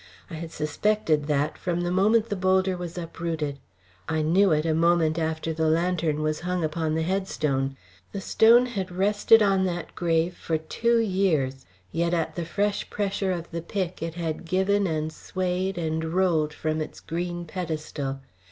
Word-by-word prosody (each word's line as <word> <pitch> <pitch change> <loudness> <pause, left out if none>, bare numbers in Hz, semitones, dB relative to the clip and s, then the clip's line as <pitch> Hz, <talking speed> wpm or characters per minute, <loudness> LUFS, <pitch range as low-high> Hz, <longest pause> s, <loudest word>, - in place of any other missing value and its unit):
I - - -7
had 165 0 -6
suspected 155 -1 0
that 150 0 0
from 175 -1 -1
the 175 0 -1
moment 215 +5 +3
the 205 - -1
boulder 190 0 +2
was 175 -1 -6
uprooted; 165 -4 -3 0.5
I 160 -1 +1
knew 185 +5 +4
it 155 0 +2
a 160 - +2
moment 165 0 +3
after 160 0 -2
the 160 0 0
lantern 160 -2 +1
was 155 0 0
hung 180 0 -2
upon 155 0 -1
the 160 - 0
headstone. 150 -7 -1 0.3
The 200 - -4
stone 230 +5 +5
had 200 -7 -3
rested 205 +4 +4
on 195 -2 +3
that 175 -2 -3
grave 170 0 +1
for 160 - -1
two 235 +9 +1
years, 180 - +1 0.2
yet 170 +1 +1
at 165 -2 -1
the 170 - -4
fresh 205 +4 -1
pressure 195 -1 -1
of 170 -2 -4
the 170 0 -3
pick 185 0 -3
it 165 0 -4
had 165 -2 -3
given 190 +3 +2
and 155 -1 -2
swayed 185 +2 -2
and 160 -1 -1
rolled 160 -2 +1
from 155 +1 -2
its 155 - -6
green 175 +1 -4
pedestal. 155 -5 -4
170 Hz, 170 wpm, -26 LUFS, 155-190 Hz, 0.5 s, stone